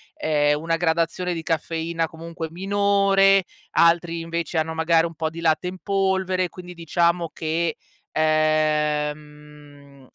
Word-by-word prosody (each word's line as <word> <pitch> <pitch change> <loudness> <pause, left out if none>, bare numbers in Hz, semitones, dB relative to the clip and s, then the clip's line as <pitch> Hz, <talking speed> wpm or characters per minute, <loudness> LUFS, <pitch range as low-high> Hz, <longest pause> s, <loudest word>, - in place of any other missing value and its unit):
ehm, 150 -1 +1
una 165 +1 -1
gradazione 170 +2 0
di 165 - -5
caffeina 165 +1 -2
comunque 165 0 -7
minore, 195 +1 +3 0.3
altri, 170 0 +3
invece, 165 0 -3
hanno 160 0 0
magari 160 0 +2
un 165 - -5
po' 160 0 -2
di 165 +1 -9
latte 165 +2 +1
in 185 +1 -5
polvere, 190 -2 0
quindi 180 0 -10
diciamo 170 0 0
che, 165 +1 -2 0.4
ehm, 150 -2 -1
165 Hz, 125 wpm, -23 LUFS, 155-175 Hz, 0.4 s, minore